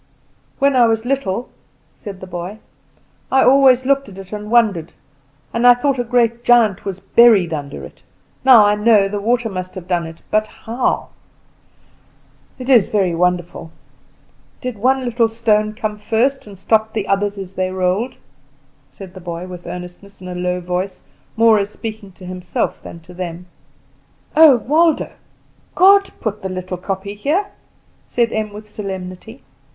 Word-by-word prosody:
"When 275 0 +2
I 240 -2 +5
was 225 0 0
little," 245 -4 -2 0.5
said 200 -3 -10
the - - -7
boy, 180 +3 -6 0.7
"I 265 - +4
always 260 -1 +5
looked 275 -1 +1
at 190 - -13
it 195 +1 -10
and 210 0 -6
wondered, 215 -9 +2 0.6
and 235 +1 +3
I 245 - +8
thought 265 +1 -1
a - - +1
great 235 -1 +1
giant 230 -6 +3
was 195 -2 -4
buried 210 -9 +4
under 145 -2 -6
it. - - -15 0.4
Now 245 -5 +7
I 205 - +3
know 210 -1 +4
the 205 +1 -4
water 235 +2 +1
must 185 -3 -6
have 185 -2 -8
done 175 -2 -1
it; 165 0 -13
but 215 0 +2
how? 230 +3 -3 1.5
It 255 - -8
is 245 -8 +5
very 195 -5 0
wonderful. 175 -1 -1 0.9
Did 250 -5 -6
one 260 +3 +1
little 235 -1 +1
stone 215 -2 0
come 215 -2 -4
first, 235 +5 0
and 200 -2 -12
stop 220 +3 +1
the 215 -3 -3
others 200 +1 0
as 190 -1 -8
they 185 -1 -1
rolled?" 190 +7 -1 0.7
said 190 -2 -12
the 185 - -11
boy 170 0 -6
with 180 -2 -10
earnestness, 180 +3 -9
in 185 - -10
a 180 - -5
low 180 0 -2
voice, 180 +1 -4 0.3
more 225 -1 +5
as 200 0 -2
speaking 215 -2 -8
to 185 - -14
himself 180 0 -3
than 170 - -11
to 180 +2 -15
them. 175 -1 -6 0.9
"Oh, 310 -3 +8
Waldo, 310 +8 +1 0.6
God 395 +1 +5
put 210 -1 -4
the 190 - -4
little 185 0 -5
kopje 195 +2 -5
here," 340 - 0 0.6
said 235 -2 0
Em 215 -1 -2
with 210 +1 -10
solemnity. 195 +2 -8
210 Hz, 165 wpm, -18 LUFS, 185-240 Hz, 1.5 s, I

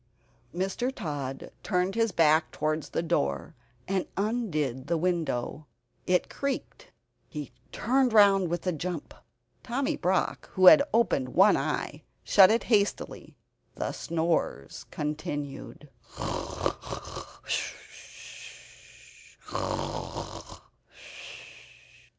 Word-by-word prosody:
Mr. 195 +8 -1
Tod 145 - -5
turned 180 -1 0
his 230 -1 +2
back 160 -2 +4
towards 155 0 -1
the - - -1
bed, 70 - -1 0.3
and 190 -1 0
undid 160 - -1
the 170 - +1
window. 155 -5 -1 0.4
It 180 0 +3
creaked; 280 -1 -4 0.4
he 150 -4 -6 0.2
turned 255 +2 +2
round 200 -4 +6
with 175 +1 -2
a 180 - +2
jump. 170 0 -4 0.5
Tommy 265 +3 -1
Brock, 185 +1 0
who 185 - +3
had 280 +10 +11
opened 215 - +2
one 195 +4 +7
eye - - -2 0.2
shut 195 -2 +7
it 230 +2 +2
hastily. 205 -3 0 0.4
The - - -2
snores 160 - -2
continued. 150 -1 -5 0.3
Mr. - - -4
175 Hz, 90 wpm, -28 LUFS, 150-205 Hz, 0.5 s, had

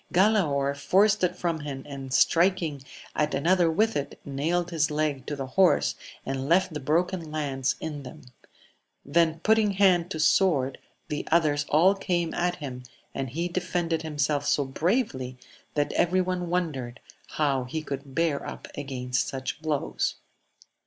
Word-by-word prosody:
Galaor 170 -8 +3
forced 200 +8 +3
it 180 0 +2
from 170 -2 -1
him, 140 -3 -6
and 135 -2 -7
striking 165 0 +2 0.3
at 150 -2 +1
another 170 +4 +3
with 215 +7 +2
it, 140 0 -3
nailed 165 +6 -1
his 155 -3 +1
leg 150 -3 -1
to 145 - -2
the 135 -1 -4
horse, 180 +8 +3 0.3
and 135 +1 -3
left 185 0 +3
the 150 - -3
broken 165 +4 0
lance 140 -4 -1
in 150 -2 -5
them; 140 +3 -10 0.8
then 160 +2 +2
putting 215 -1 +3
hand 185 -3 +4
to 160 - -4
sword, 155 -5 +3 0.3
the 150 - -3
others 150 -3 +2
all 175 +6 +5
came 175 -4 -1
at 175 0 0
him, 135 -7 -7 0.3
and 135 -1 -3
he 165 +8 -2
defended 175 -2 -1
himself 150 -2 0
so 145 0 +1
bravely 135 - -1 0.4
that 145 -1 0
every 185 +2 +2
one 180 -1 -1
wondered 145 -9 -2 0.4
how 140 -4 +1
he 155 +5 -4
could 140 -2 -6
bear 165 -4 +1
up - - -7
against 125 -2 -2
such 135 +3 -4
blows. 155 -3 -1
155 Hz, 150 wpm, -27 LUFS, 140-175 Hz, 0.8 s, all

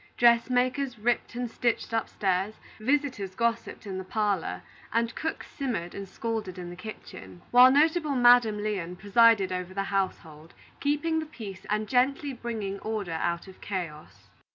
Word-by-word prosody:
Dressmakers 250 +2 +3
ripped 235 +2 0
and 245 0 -2
stitched 235 0 -1
upstairs, 200 -2 0 0.2
visitors 250 -6 0
gossiped 230 0 -1
in 190 -2 -4
the - - -5
parlor, 205 -1 -1 0.3
and 230 0 +1
cooks 320 - -4
simmered 235 - -3
and 195 -1 -7
scolded 220 -5 -4
in 175 -1 -6
the - - -8
kitchen; 95 - -10
while 250 +1 +9
notable 305 +1 +3
Madam 240 -4 +5
Lyon 185 -5 -2
presided 205 0 +4
over 180 0 -4
the 195 - 0
household, 165 -5 -3 0.2
keeping 295 +3 +1
the 315 - -5
peace 200 -10 -9
and 210 +1 0
gently 270 +3 +1
bringing 220 -5 -4
order 215 -5 -3
out 170 +2 -2
of 190 - -14
chaos. 170 -6 -6
215 Hz, 150 wpm, -28 LUFS, 190-245 Hz, 0.3 s, while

